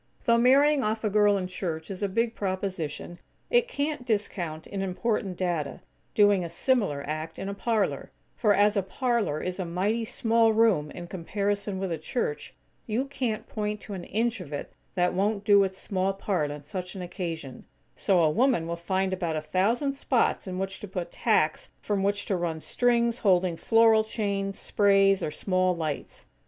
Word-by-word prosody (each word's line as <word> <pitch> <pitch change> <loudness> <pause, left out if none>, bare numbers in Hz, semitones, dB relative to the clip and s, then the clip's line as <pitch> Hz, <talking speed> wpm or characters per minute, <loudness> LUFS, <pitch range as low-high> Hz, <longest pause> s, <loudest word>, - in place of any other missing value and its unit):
Though 235 0 +4
marrying 275 +4 +5
off 220 +1 -1
a 215 - 0
girl 205 -1 +4
in 185 - -2
church 175 -2 -4
is 190 - -6
a 200 - 0
big 230 +4 0
proposition, 185 -5 -4 0.3
it 485 0 +4
can't 295 - -2
discount, 190 -8 -2
in 195 - -4
important 195 0 -1
data, 170 -6 -2 0.3
doing 205 -3 +5
a 170 - -4
similar 200 - +1
act 155 +2 -4
in 195 - -5
a 200 - -3
parlor; 215 0 -1 0.3
for, 210 -3 +3
as 205 +1 +4
a 200 - +3
parlor 215 - -1
is 185 +1 -3
a - - 0
mighty 195 +7 -1
small 225 -1 +2
room 215 -10 +3
in 175 - -8
comparison 200 +3 -2
with 190 -1 -3
a 165 - -2
church, 255 - -3 0.3
you 235 +4 0
can't 250 -5 -3
point 210 -1 -3
to 205 - -8
an 180 -3 -6
inch 225 0 -1
of 155 -5 -10
it 145 - -5 0.2
that 180 -1 +2
won't 200 +2 0
do 200 -1 +6
its 190 -1 -3
small 190 0 -1
part 190 -6 -1
on 145 0 -7
such 180 +5 -6
an 185 - -5
occasion; 165 -7 -6 0.3
so 185 -4 +2
a 155 - +4
woman 240 - +2
will 170 +1 -3
find 190 +2 -1
about 175 -4 -2
a - - 0
thousand 225 - +1
spots 255 -6 0
in 185 -1 -4
which 190 0 -3
to 210 - -7
put 180 -2 -5
tacks 180 -9 +1
from 195 +9 -1
which 200 +1 0
to 195 - 0
run 170 -3 -2
strings 235 +5 +1
holding 185 -4 +3
floral 225 +3 +4
chains, 200 -3 -2
sprays, 195 -1 +3
or 155 - -1
small 185 +2 0
lights. 155 -4 -5
195 Hz, 185 wpm, -27 LUFS, 175-220 Hz, 0.3 s, do